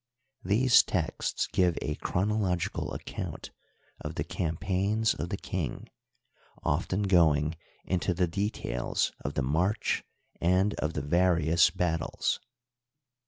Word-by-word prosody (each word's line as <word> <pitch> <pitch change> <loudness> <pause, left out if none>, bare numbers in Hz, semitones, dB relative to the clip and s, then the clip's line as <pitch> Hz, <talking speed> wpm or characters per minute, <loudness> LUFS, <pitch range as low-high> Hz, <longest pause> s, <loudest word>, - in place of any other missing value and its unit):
These 120 +6 +5
texts - - -1
give 90 -2 +1
a 75 - -2
chronological 95 0 -1
account - - -6 0.5
of - - -6
the - - -1
campaigns 95 +6 0
of 85 - -4
the 100 - -2
king, 85 -12 -4 0.7
often 95 +3 0
going 80 -5 +3 0.3
into 90 0 0
the 90 +1 +2
details 85 - -1
of 70 - -4
the 70 - 0
march 90 - +1 0.4
and 95 +4 +3
of 75 +1 -1
the - - -3
various 85 +1 +4
batUes. 85 -2 -1
90 Hz, 115 wpm, -29 LUFS, 80-100 Hz, 0.7 s, These